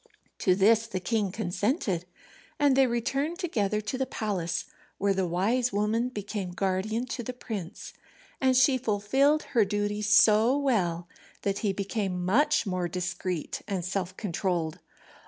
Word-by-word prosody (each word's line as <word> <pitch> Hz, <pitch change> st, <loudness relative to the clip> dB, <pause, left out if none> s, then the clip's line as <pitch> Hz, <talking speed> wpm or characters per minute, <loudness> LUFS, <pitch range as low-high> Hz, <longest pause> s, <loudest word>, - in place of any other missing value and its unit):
To 185 Hz, -, +3 dB
this 220 Hz, +3 st, +4 dB
the 190 Hz, -4 st, -3 dB
king 205 Hz, +1 st, -1 dB
consented, 200 Hz, -, -1 dB, 0.5 s
and 285 Hz, -2 st, +4 dB
they 270 Hz, -1 st, +5 dB
returned 270 Hz, +7 st, -1 dB
together 215 Hz, -, -1 dB
to 215 Hz, +5 st, -4 dB
the 265 Hz, -, 0 dB
palace, 190 Hz, -6 st, -2 dB, 0.3 s
where 200 Hz, 0 st, +2 dB
the 190 Hz, -1 st, 0 dB
wise 225 Hz, +9 st, +1 dB
woman 215 Hz, +4 st, 0 dB
became 205 Hz, -4 st, -4 dB
guardian 195 Hz, +6 st, -1 dB
to 255 Hz, -1 st, -4 dB
the 250 Hz, +2 st, -5 dB
prince, 205 Hz, -8 st, -7 dB, 0.5 s
and 260 Hz, -1 st, +4 dB
she 260 Hz, 0 st, +4 dB
fulfilled 260 Hz, +7 st, +2 dB
her 230 Hz, -4 st, +5 dB
duties 205 Hz, +1 st, -1 dB
so 220 Hz, +4 st, +5 dB
well 180 Hz, -12 st, 0 dB, 0.4 s
that 200 Hz, 0 st, 0 dB
he 210 Hz, -4 st, 0 dB
became 195 Hz, -2 st, -2 dB
much 290 Hz, +9 st, +3 dB
more 185 Hz, -2 st, -1 dB
discreet 180 Hz, -1 st, -3 dB
and 185 Hz, -4 st, -2 dB
self 185 Hz, 0 st, -3 dB
controlled. 175 Hz, -5 st, -2 dB
210 Hz, 145 wpm, -28 LUFS, 185-245 Hz, 0.5 s, they